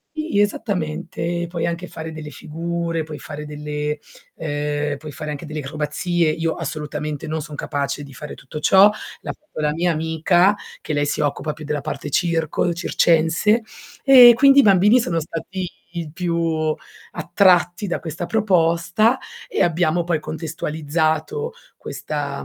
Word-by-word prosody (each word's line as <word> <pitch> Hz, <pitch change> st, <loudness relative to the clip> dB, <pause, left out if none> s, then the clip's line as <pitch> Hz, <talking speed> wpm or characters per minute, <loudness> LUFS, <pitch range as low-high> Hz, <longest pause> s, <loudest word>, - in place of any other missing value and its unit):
Sì, 310 Hz, -9 st, -1 dB
esattamente. 175 Hz, -6 st, -2 dB
Ehm, 175 Hz, 0 st, -1 dB
puoi 170 Hz, -1 st, -3 dB
anche 170 Hz, +1 st, -3 dB
fare 160 Hz, -1 st, -7 dB
delle 155 Hz, -1 st, -7 dB
figure, 165 Hz, +3 st, -3 dB
puoi 155 Hz, -1 st, -8 dB
fare 150 Hz, 0 st, -8 dB
delle, 150 Hz, 0 st, -3 dB, 0.4 s
ehm, 145 Hz, -1 st, -2 dB
puoi 150 Hz, +1 st, -9 dB
fare 150 Hz, +1 st, -6 dB
anche 150 Hz, +2 st, -6 dB
delle 155 Hz, 0 st, -5 dB
acrobazie, 155 Hz, +4 st, -1 dB
io 165 Hz, +1 st, 0 dB
assolutamente 150 Hz, -1 st, -4 dB
non 155 Hz, 0 st, -3 dB
sono 150 Hz, 0 st, -8 dB
capace 140 Hz, 0 st, -2 dB
di 140 Hz, -, -12 dB
fare 150 Hz, +3 st, -8 dB
tutto 140 Hz, +3 st, -8 dB
ciò, 195 Hz, +6 st, +6 dB, 0.3 s
l'ha -, -, -4 dB
fatto 305 Hz, -, -12 dB
la 150 Hz, -1 st, +1 dB
mia 175 Hz, +2 st, +1 dB
amica, 165 Hz, +5 st, +3 dB, 0.3 s
che 155 Hz, -, -4 dB
lei 145 Hz, 0 st, +1 dB
si -, -, -2 dB
occupa 150 Hz, +1 st, -1 dB
più 155 Hz, -, -10 dB
della 150 Hz, -1 st, -2 dB
parte 145 Hz, -, -5 dB
circo, 165 Hz, +1 st, +1 dB
circense 170 Hz, +6 st, +2 dB, 0.4 s
e 250 Hz, -3 st, +10 dB
quindi 275 Hz, +3 st, +6 dB
i -, -, +10 dB
bambini 205 Hz, +2 st, +5 dB
sono 170 Hz, -8 st, 0 dB
stati 175 Hz, +4 st, -5 dB, 0.3 s
i 165 Hz, -3 st, -4 dB
più 165 Hz, -2 st, 0 dB, 0.4 s
attratti 180 Hz, +2 st, +3 dB
da 175 Hz, -, -2 dB
questa 165 Hz, +1 st, -5 dB
proposta 200 Hz, +3 st, +2 dB, 0.3 s
e -, -, +1 dB
abbiamo 170 Hz, 0 st, +2 dB
poi 170 Hz, -2 st, 0 dB
contestualizzato 160 Hz, -, -2 dB, 0.3 s
questa, 145 Hz, -2 st, -4 dB
160 Hz, 150 wpm, -21 LUFS, 150-175 Hz, 0.4 s, e